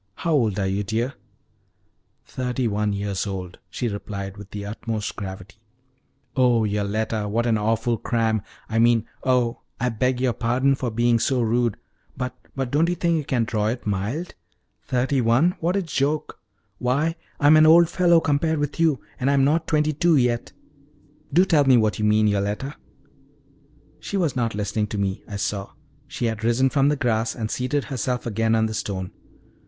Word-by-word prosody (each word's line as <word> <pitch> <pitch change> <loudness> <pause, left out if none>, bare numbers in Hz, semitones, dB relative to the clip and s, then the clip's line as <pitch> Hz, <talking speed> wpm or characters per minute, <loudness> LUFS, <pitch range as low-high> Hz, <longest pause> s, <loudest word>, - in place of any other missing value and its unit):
How 170 - -2
old 115 -9 +2
are 100 - 0
you, 95 +2 -1
dear?" 115 +6 -2 1.1
"Thirty 125 -1 -2
one 105 0 0
years 100 0 -2
old," 90 -2 -6
she 125 - -3
replied, 100 -2 -5
with 100 -1 -11
the 100 0 -6
utmost 110 0 -4
gravity. 95 0 -8 0.8
"Oh, 125 -3 +3
Yoletta, 105 +1 -1
what 115 +3 0
an 115 -2 +2
awful 115 +2 0
cram! 110 -2 0 0.3
I 115 0 -1
mean 115 -1 +4 0.2
oh, 125 -2 +1 0.2
I 125 - +1
beg 125 +2 0
your 125 -2 +1
pardon 125 +4 +1
for 130 -2 -2
being 120 +1 +2
so 130 +2 +1
rude! 115 -1 +1 0.4
But 125 -1 -3 0.2
but 135 -2 -3
don't 160 +4 +3
you 175 - 0
think 170 -1 +1
you 155 - -2
can 130 -4 0
draw 110 -2 -1
it 120 +3 -3
mild? 105 - -2 0.5
Thirty 130 +1 +1
one 125 +10 +3
what 175 +3 0
a 200 - +1
joke! 150 -1 -2 0.4
Why, 145 +7 0 0.2
I'm 145 +2 +6
an 155 0 +7
old 170 +1 +7
fellow 175 -1 +4
compared 160 +1 +1
with 145 +2 -3
you, 160 -5 +2 0.2
and 130 - +1
I'm 140 -1 +3
not 155 +4 +2
twenty 155 0 +1
two 170 +2 +3
yet. 120 -3 +1 0.8
Do 180 +6 +5
tell 155 -6 +3
me 130 -2 +6
what 110 -4 +1
you 105 - +1
mean, 105 0 +4
Yoletta?" 105 +7 -1 1.2
She 200 - -4
was 165 -8 0
not 115 -3 -1
listening 105 +1 -1
to 105 - -5
me, 100 -1 -2
I 105 - -7
saw: 100 0 -3 0.3
she 130 -3 -3
had 110 -1 -2
risen 125 +3 +2
from 140 0 +3
the 150 - +2
grass 115 -3 0
and 110 -3 -4
seated 130 +3 -1
herself 125 -2 -3
again 115 0 +1
on 110 0 +2
the 110 - -3
stone. 95 -3 -4
120 Hz, 180 wpm, -23 LUFS, 105-140 Hz, 1.2 s, an